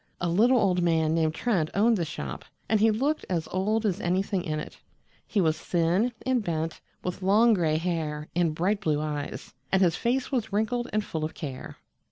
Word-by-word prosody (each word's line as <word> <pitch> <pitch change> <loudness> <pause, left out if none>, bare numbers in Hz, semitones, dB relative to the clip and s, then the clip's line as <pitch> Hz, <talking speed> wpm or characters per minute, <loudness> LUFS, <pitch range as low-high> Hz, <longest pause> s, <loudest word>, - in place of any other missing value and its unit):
A 175 - -1
little 230 +9 +4
old 185 -5 +2
man 160 -2 +2
named 160 -1 +1
Trent 185 -10 0
owned 225 +4 +4
the 175 -5 -1
shop, 70 - -6 0.2
and 220 - +2
he 220 +2 +5
looked 275 +8 0
as 170 -4 -1
old 210 +4 0
as 200 -1 0
anything 185 +1 0
in 155 -1 -2
it. - - -8 0.5
He 210 - 0
was 160 -4 +2
thin 175 +8 +1
and 255 -3 +1
bent, 165 -3 -3 0.2
with 180 +1 -4
long 215 +5 +5
gray 160 -6 +2
hair 160 -3 -2
and 170 -3 +1
bright 195 +5 0
blue 155 -6 +1
eyes, 150 -1 -5 0.2
and 190 - +4
his 175 -4 +3
face 250 +5 -1
was 240 -6 -1
wrinkled 220 +4 0
and 215 0 0
full 160 -1 -4
of 155 - -4
care. 135 -5 -7
180 Hz, 200 wpm, -27 LUFS, 160-215 Hz, 0.5 s, he